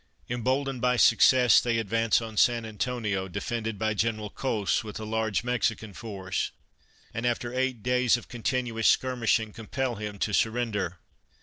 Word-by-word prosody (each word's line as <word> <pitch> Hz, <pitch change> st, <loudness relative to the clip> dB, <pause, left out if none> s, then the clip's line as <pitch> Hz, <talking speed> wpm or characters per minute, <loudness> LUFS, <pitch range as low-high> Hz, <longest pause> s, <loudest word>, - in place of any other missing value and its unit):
Emboldened 130 Hz, +2 st, -1 dB
by 125 Hz, 0 st, +2 dB
success, 125 Hz, +1 st, +6 dB
they 120 Hz, -1 st, 0 dB
advance 115 Hz, +1 st, +1 dB
on 110 Hz, -1 st, -7 dB
San 115 Hz, +2 st, +3 dB
Antonio, 105 Hz, -3 st, -2 dB
defended 110 Hz, +3 st, -3 dB
by 110 Hz, +1 st, 0 dB
General 110 Hz, -1 st, -1 dB
Cos 110 Hz, -7 st, -1 dB
with 105 Hz, -1 st, -7 dB
a 110 Hz, -, -5 dB
large 110 Hz, 0 st, -1 dB
Mex 125 Hz, -1 st, +1 dB
ican 110 Hz, -2 st, -10 dB
force, 95 Hz, -5 st, -3 dB, 0.6 s
and 115 Hz, -, -4 dB
after 120 Hz, 0 st, -1 dB
eight 130 Hz, -3 st, -1 dB
days 125 Hz, -1 st, +3 dB
of 120 Hz, -, -11 dB
continuous 120 Hz, -1 st, -1 dB
skir 130 Hz, 0 st, +2 dB
mishing 110 Hz, -2 st, +1 dB
compel 120 Hz, +2 st, -3 dB
him 105 Hz, -1 st, -5 dB
to 105 Hz, +2 st, -2 dB
surrender. 110 Hz, -6 st, 0 dB
115 Hz, 160 wpm, -27 LUFS, 105-125 Hz, 0.6 s, success